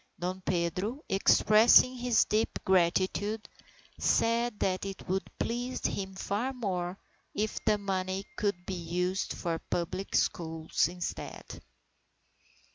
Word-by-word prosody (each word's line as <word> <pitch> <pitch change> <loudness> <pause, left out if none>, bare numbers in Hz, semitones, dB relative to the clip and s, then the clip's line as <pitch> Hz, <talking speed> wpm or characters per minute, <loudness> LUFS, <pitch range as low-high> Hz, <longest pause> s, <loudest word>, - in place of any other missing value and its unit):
Dom 185 +2 -3
Pedro, 185 - -1
expressing 215 +5 +6
his 245 -2 +3
deep 215 +1 0
gratitude, 190 +4 +1 0.5
said 230 -1 +2
that 185 -1 0
it 195 -1 -6
would 190 +1 -1
please 245 +2 -3
him 190 -1 -2
far 210 +7 -2
more 185 -6 -3 0.4
if 215 +1 -2
the 210 - +4
money 190 -1 -2
could 200 -4 -1
be 190 - -4
used 180 +2 -2
for 165 -1 -3
public 185 +3 -2
schools 160 -3 +1
instead. 175 0 -6
195 Hz, 115 wpm, -30 LUFS, 180-215 Hz, 0.5 s, expressing